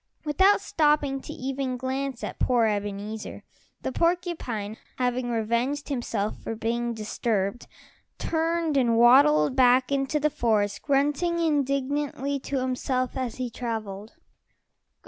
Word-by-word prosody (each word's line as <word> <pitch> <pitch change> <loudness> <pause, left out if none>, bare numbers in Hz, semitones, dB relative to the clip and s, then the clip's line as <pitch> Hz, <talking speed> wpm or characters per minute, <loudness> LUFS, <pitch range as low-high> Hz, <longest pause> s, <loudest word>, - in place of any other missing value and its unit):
Without 380 +7 +4
stopping 295 -3 +1
to - - -8
even 265 -1 -3
glance 260 0 -3
at - - -5
poor 245 -3 +3
Ebenezer, 205 0 -3 0.4
the - - -2
porcupine, 335 - -1 0.2
having 250 0 -1
revenged 235 +6 -1
himself 230 -6 -2
for 225 - -4
being 235 +1 -2
disturbed, 215 0 -2 0.5
turned 330 -2 0
and 235 -3 +3
waddled 265 +4 +6
back 255 0 +4
into 275 +2 0
the 300 +1 +1
forest, 220 -7 0
grunting 295 +5 +1
indignantly 285 -2 0
to 275 +1 -3
himself 255 0 -1
as 255 -3 -3
he 250 -2 -4
traveled. 220 -3 -5
255 Hz, 120 wpm, -26 LUFS, 230-285 Hz, 0.5 s, waddled